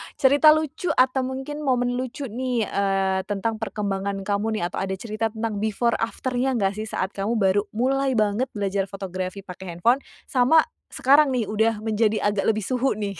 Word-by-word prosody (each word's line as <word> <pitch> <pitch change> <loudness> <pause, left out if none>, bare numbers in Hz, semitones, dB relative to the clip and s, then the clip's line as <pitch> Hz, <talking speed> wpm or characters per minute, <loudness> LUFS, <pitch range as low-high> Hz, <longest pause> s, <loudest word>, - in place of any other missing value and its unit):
cerita 290 +3 +6
lucu 315 +3 -3
atau 255 +1 +3
mungkin 265 +3 -4
momen 245 -1 +1
lucu 260 0 -5
nih, 250 0 -1
eee, 195 -1 0
tentang 215 +2 -2
perkembangan 200 -2 -2
kamu 210 +2 -1
nih? - - -2
Atau - - -4
ada 190 0 -2
cerita 215 +2 -2
tentang 220 -1 -4
before 220 +2 0
after-nya 255 +3 -1
enggak 195 -4 +1
sih 220 - -4
saat 190 -2 -2
kamu 205 +4 -2
baru 200 -1 +3
mulai 265 +3 +1
banget 215 +4 +1
belajar 195 -1 -1
fotografi 190 0 -5
pakai 180 -2 -8
handphone, 240 +9 +3 0.2
sama 265 +5 +4 0.2
sekarang 275 0 +4
nih 240 - +1
udah 220 0 +1
menjadi 220 -1 +1
agak 205 -1 +1
lebih 215 -1 +1
suhu 255 +4 0
nih? 200 -4 -4
220 Hz, 175 wpm, -24 LUFS, 200-255 Hz, 0.2 s, cerita